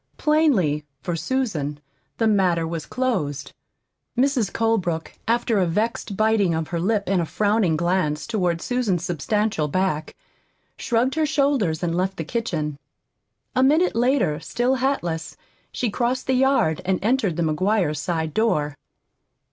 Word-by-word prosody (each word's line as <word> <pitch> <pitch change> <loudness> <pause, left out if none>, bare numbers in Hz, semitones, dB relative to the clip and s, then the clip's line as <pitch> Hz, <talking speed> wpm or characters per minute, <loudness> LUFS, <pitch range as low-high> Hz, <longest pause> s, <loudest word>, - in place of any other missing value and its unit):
Plainly, 250 - +2 0.2
for 175 - -2
Susan, 165 - -2 0.4
the 225 - +1
matter 185 -6 +2
was 165 -2 -5
closed. 150 - -2 0.6
Mrs. 255 -5 +2
Colebrook, 190 -8 0
after 230 -2 +2
a 180 - +2
vexed 210 +2 -2
biting 215 -5 +2
of 160 -1 -3
her 170 - -2
lip 200 +3 +1
and 185 -1 +1
a - - -1
frowning 205 -5 +1
glance 170 -3 0
toward 180 -7 -1
Susan's 235 -9 0
substantial 180 0 0
back, 155 -1 -1 0.6
shrugged 245 +2 0
her 315 -1 +1
shoulders 275 - +1
and 170 -1 0
left 190 +2 -1
the 160 - -2
kitchen. 155 -7 -3 0.8
A 255 - +3
minute 305 +6 +3
later, 235 - +2
still 245 - 0
hatless, 175 -12 -2 0.3
she 240 -4 -2
crossed 245 +4 -1
the 265 - +1
yard 255 - +2
and 185 0 +1
entered 220 -6 +1
the 170 - 0
McGuires' 165 0 +1
side 160 0 -2
door. 150 -10 +1
195 Hz, 140 wpm, -23 LUFS, 160-240 Hz, 0.8 s, A